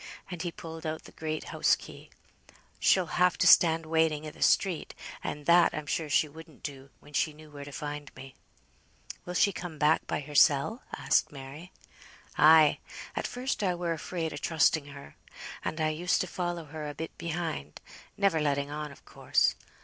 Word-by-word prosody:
and 175 -2 -5
he 175 -1 -3
pulled 165 -1 -9
out 155 -1 -4
the - - -13
great 155 -1 -5
house - - +4
key. - - -12 0.7
"She'll 185 -2 +4 0.2
have 180 -1 +4
to - - +2
stand 165 -1 +6
waiting 160 -1 +1
i' 155 - -6
th' - - -17
street, 180 -5 +1 0.3
and 145 0 -5
that 170 +1 +5
I'm 155 - -4
sure 155 +1 -2
she 155 - +3
wouldn't 160 0 -14
do, 135 -1 -7
when 145 - -17
she 155 +1 +1
knew 155 0 -15
where 145 -1 -8
to 145 - -9
find 145 0 -6
me." 135 0 -11 0.9
"Will 180 - -6
she 200 - +4
come 175 -3 -7
back 150 +2 +2
by - - -2
hersel?" 145 - +3 0.2
asked - - +2
Mary. 145 +6 -10 0.6
"Ay. 155 -1 +6 0.4
At - - -2
first 255 0 -3
I 185 -3 +1
were 170 -1 -1
afraid 165 0 -4
o' - - -6
trusting 160 0 +2
her, 140 -1 -12 0.5
and 160 - -3
I 155 0 +2
used 170 +4 0
to - - -1
follow 175 -2 -4
her 150 0 -6
a 145 - -8
bit 160 - -6
behind; 165 - -4 0.4
never 195 -5 +2
letting 140 -1 0
on, 150 0 -5
of 140 - -16
course. - - +1
155 Hz, 185 wpm, -29 LUFS, 145-170 Hz, 0.9 s, stand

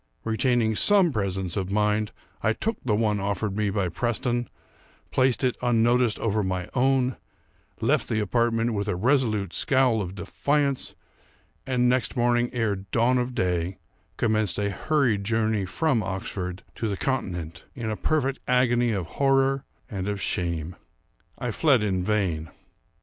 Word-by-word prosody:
Retaining 115 -1 +1
some 190 - +4
presence 95 -4 -1
of 95 -2 -2
mind, 105 +1 +1 0.3
I 110 - +2
took 225 - -2
the 110 -5 +1
one 105 -1 +1
offered 100 +1 -2
me 105 -1 0
by 100 -2 0
Preston; 120 +5 -1 0.6
placed 130 0 +2
it, 125 -2 +2
unnoticed, 120 -1 +3
over 110 -1 0
my 95 -2 -2
own; 130 0 +2 0.6
left - - +1
the 110 - +1
apartment 115 +2 +1
with 100 -1 -2
a 105 - 0
resolute 110 -4 +1
scowl 130 -5 +2
of 95 -1 -5
defiance; 140 - -1 0.7
and, 125 -1 +2
next 125 -3 +1
morning 120 0 +2
ere 115 -5 0
dawn 115 +6 +1
of 125 0 -3
day, 90 -3 -1 0.4
commenced 110 -4 +1
a 100 0 0
hurried 120 -2 +1
journey 110 -1 0
from 115 - +1
Oxford 95 -1 -4
to 115 - -3
the 100 -2 -2
continent, 90 - -3
in 115 -4 -3
a - - -1
perfect 135 +1 0
agony 120 -2 +3
of 95 -4 -2
horror 135 - +1 0.2
and 95 -4 -4
of 100 -1 -2
shame. 85 -2 -2 0.6
I 125 - -3
fled 130 -2 +3
in 95 -3 0
vain. 90 -7 0
110 Hz, 150 wpm, -26 LUFS, 100-125 Hz, 0.7 s, some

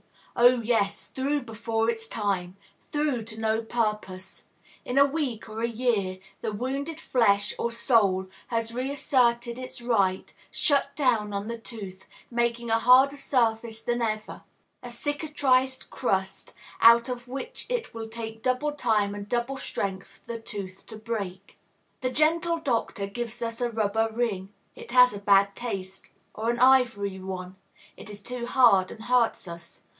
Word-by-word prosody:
Oh, 245 0 +5
yes; 210 -3 +1
through 280 +2 -1
before 225 -1 -2
its 225 -1 -3
time. 195 -5 -2 0.4
Through 295 -6 0
to 220 0 -8
no 220 0 +1
purpose. 210 -5 -3 0.4
In 250 - -3
a 280 - +8
week, 275 -7 -3
or 220 +1 -6
a 235 - +2
year, 220 -6 0 0.2
the 215 - -3
wounded 275 +8 -3
flesh, 205 -5 +2
or 235 - 0
soul, 225 -6 +2 0.2
has 230 -1 -2
reasserted 250 -2 +1
its 255 -1 -7
right, 200 -6 +1 0.2
shut 280 -2 +1
down 230 -7 +1
on 200 +1 -3
the 235 0 -4
tooth, 200 -5 -9 0.3
making 235 -1 0
a 225 - +4
harder 260 +4 +6
surface 225 -4 0
than 240 0 -1
ever, 215 -1 -3 0.4
a 245 - -8
cicatrized 265 -1 0
crust, 190 -6 -2 0.3
out 235 +1 +7
of 250 -1 -5
which 275 - -6
it - - -2
will 225 -1 -6
take 225 0 -7
double 255 +4 0
time 220 -8 +1
and 205 0 -7
double 240 +3 -1
strength 195 -6 -3 0.2
for 235 - -5
the 230 - -5
tooth 195 -4 -8
to 220 - -9
break. 205 -4 -6 0.4
The 255 - -1
gentle 330 +5 +2
doctor 235 -9 -1
gives 235 +3 -5
us 230 +1 -4
a 240 - +1
rubber 220 0 0
ring, 210 -5 -2 0.2
it 470 -2 -11
has 250 -1 +7
a 205 - -6
bad 200 0 +4
taste; 195 -5 -6 0.2
or 225 +2 -2
an 240 - +1
ivory 240 -7 +3
one, 185 0 -6 0.4
it - - -11
is 205 -1 -8
too 245 0 -5
hard 230 -8 +5
and 220 - -10
hurts 245 -5 +2
us. 170 0 -9
230 Hz, 160 wpm, -27 LUFS, 205-250 Hz, 0.4 s, a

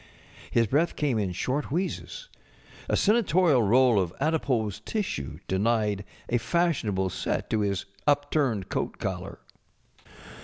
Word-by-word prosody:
His 115 - +3
breath 150 +10 +1
came 140 -7 0
in 100 -3 -1
short 130 +10 -1
wheezes; 190 - -3 0.6
a - - +2
senatorial 185 - +3
roll 120 +1 +4
of 90 -3 -1
adipose 135 - 0
tissue 185 - -3
denied 105 0 +1 0.2
a 120 - +1
fashionable 115 - 0
set - - -3
to 110 - +2
his 100 -2 -1 0.2
upturned 145 -8 +1
coat - - -3
collar. - - -5
125 Hz, 120 wpm, -27 LUFS, 100-155 Hz, 0.6 s, roll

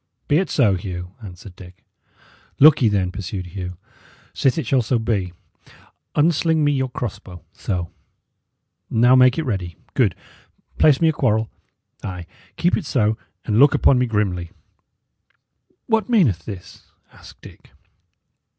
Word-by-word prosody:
"Be 145 - +3
it 190 - -2
so, 115 -9 +3
Hugh," 90 -1 -7
answered 95 -2 -11
Dick. 90 -1 -15 0.7
"Look 150 +1 +7
ye, 115 - +4
then," 95 -3 0
pursued 95 -1 -6
Hugh. 90 0 -7 0.6
"Sith 135 +2 +1
it 160 - -2
shall 135 -2 +2
so 120 +2 0
be, 105 -5 -1 0.8
unsling 160 0 +2
me 145 - +3
your 130 -2 -1
cross 120 -3 -5
bow 90 -2 -13
so: 90 -3 -4 1.0
now 120 +3 +4
make 130 0 +5
it 165 - 0
ready 95 - -4 0.2
good; - - +2 0.6
place 150 -2 +4
me 165 - +4
a - - +1
quarrel. 110 -6 0 0.5
Ay, 90 -2 -6 0.3
keep 175 - +2
it 200 - -4
so, 110 -6 +1 0.3
and 105 +1 +1
look 145 +1 +6
upon 130 - +4
me 125 - +1
grimly." 95 -6 -1 1.4
"What 225 -2 0
meaneth 140 - +2
this?" 95 -4 -10 0.3
asked - - -16
Dick. - - -15
110 Hz, 145 wpm, -21 LUFS, 90-140 Hz, 1.4 s, Look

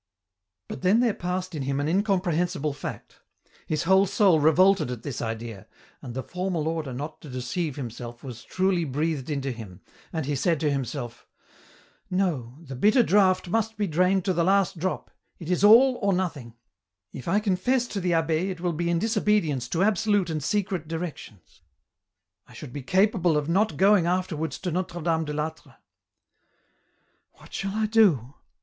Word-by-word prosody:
But - - -7
then 195 +5 +4
there 240 -3 +2
passed 180 0 -4
in 150 - -4
him 135 +1 -1
an 145 - -1
incomprehensible 180 -4 0
fact: 145 - -8 0.5
his 155 -1 -1
whole 190 +3 +4
soul 195 -4 +4
revolted 180 +2 +4
at 120 -2 -6
this 140 -4 -5
idea, 115 -3 -5 0.3
and 120 -2 -8
the 130 - -3
formal 180 -3 -3
order 160 -4 -2
not 145 +5 -6
to 150 - -11
deceive 130 +5 -3
himself 120 -2 -7
was 125 -2 -8
truly 185 -2 0
breathed 150 0 -2
into 140 -2 -2
him, 105 -6 -10 0.3
and 160 -4 -3
he 145 +1 -1
said 165 +3 +1
to 150 -2 +1
himself: 130 -3 -4 0.4
" - - -30
No, 130 -9 -3
the 135 -4 -8
bitter 215 - +4
draught 190 -3 +3
must 225 +2 -1
be 210 - 0
drained 185 +3 +1
to 190 - +1
the 170 -1 +1
last 195 -1 +2
drop, 185 +3 -3 0.3
it 170 +1 -6
is 180 - +1
all 245 +5 +7
or 200 -1 +2
nothing; 155 -11 -3 0.6
if 130 - -8
I 195 +5 +3
confess 215 +5 +1
to 200 - -3
the 180 - -1
abb6 165 +2 +1
it 185 -3 -5
will 175 0 -1
be 170 +2 -2
in 170 - +2
disobedience 190 - +1
to 170 +8 0
absolute 205 -3 +2
and 155 -2 -3
secret 190 -3 -1
directions; 150 - -7 0.9
I - - -16
should 125 - -9
be 145 - -5
capable 185 - +2
of 150 -1 -1
not 200 +6 +1
going 195 -3 +4
afterwards 165 -5 -1
to 180 - -2
Notre 175 0 -3
Dame 160 0 0
de 150 - -4
I'Atre. 155 +1 -5 0.8
" - - -43
What - - -17
shall 195 +1 -3
I 220 0 +1
do 190 - +3
170 Hz, 180 wpm, -26 LUFS, 145-190 Hz, 0.9 s, all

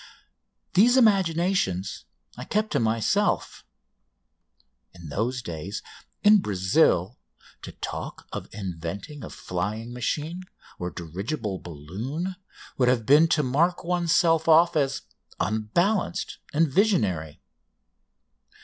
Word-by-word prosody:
These 235 +7 +5
imaginations 180 - +2 0.3
I - - -7
kept 215 +1 -1
to - - +1
myself. 115 - 0 1.3
In 85 -3 -10
those 115 - -2
days, 90 +2 -6 0.4
in 210 0 +7
Brazil, 95 - +2 0.4
to - - -9
talk - - -6
of - - -6
inventing 100 - -6
a - - -7
flying 105 +6 -4
machine 150 +8 -3 0.4
or 90 - -3
dirigible 95 - -4
balloon 110 - -5 0.4
would 125 - +4
have 120 -3 +1
been 150 +6 +6
to 160 -2 +2
mark 160 +8 +1
oneself 170 -2 +2
off 165 +1 +6
as 135 -3 0 0.4
unbalanced 170 - 0
and 160 +2 +3
visionary. 110 - +1
130 Hz, 105 wpm, -26 LUFS, -, 1.3 s, in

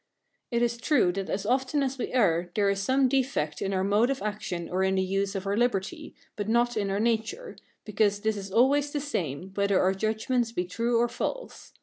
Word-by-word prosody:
It 235 -1 +1
is 235 0 0
true, 245 - +2
that 195 +1 -4
as 200 +1 -2
often 265 +4 +1
as 270 0 -3
we - - -3
err, 175 -8 +2
there 200 -2 +3
is 200 - -2
some 260 +6 +3
defect 250 - -1
in 195 - -1
our 190 -1 0
mode 205 +5 +3
of 275 -1 -2
action 205 -5 -4
or 185 +1 -1
in 190 0 +2
the 190 - +2
use 195 +1 -1
of 195 0 -3
our 200 +1 0
liberty, 240 - -1 0.2
but 205 0 -4
not 240 +1 +2
in 205 -2 -1
our 195 +1 -1
nature, 235 - -1 0.3
because 205 -1 +1
this 220 0 0
is 195 -1 -7
always 275 +6 +3
the 290 - -1
same, 185 - -4
whether 200 -1 +2
our 190 +1 +3
judgments 220 +4 -1
be 180 -6 -2
true 230 +6 0
or 240 +1 +3
false. - - -5
215 Hz, 220 wpm, -27 LUFS, 195-250 Hz, 0.3 s, there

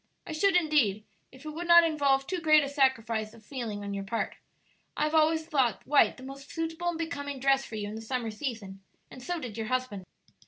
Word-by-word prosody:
"I - - -7
should 370 +5 +2
indeed, 295 - +2 0.3
if 260 +3 -15
it 305 - -5
would 335 +3 -6
not 340 0 +8
involve 285 -4 +2
too 370 +3 -3
great 310 -2 +5
a 280 - -3
sacrifice 230 -6 0
of 220 -2 -18
feeling 225 -6 -5
on 200 0 -4
your 200 0 -4
part. 225 +4 -3 0.6
I - - +1
have 305 +1 0
always 320 0 +3
thought 265 - 0
white 295 - +4
the 260 - -12
most 275 +1 -10
suitable 325 +1 -4
and 340 - -3
becoming 285 -4 -4
dress 270 +1 +2
for 225 - -8
you 205 -1 -4
in 205 - -6
the 220 - -6
summer 230 0 -3
season, 215 -5 -6 0.3
and 255 - -11
so 350 +6 -3
did 230 -6 -7
your 220 - -3
husband." 255 -7 -3
270 Hz, 225 wpm, -29 LUFS, 225-310 Hz, 0.6 s, not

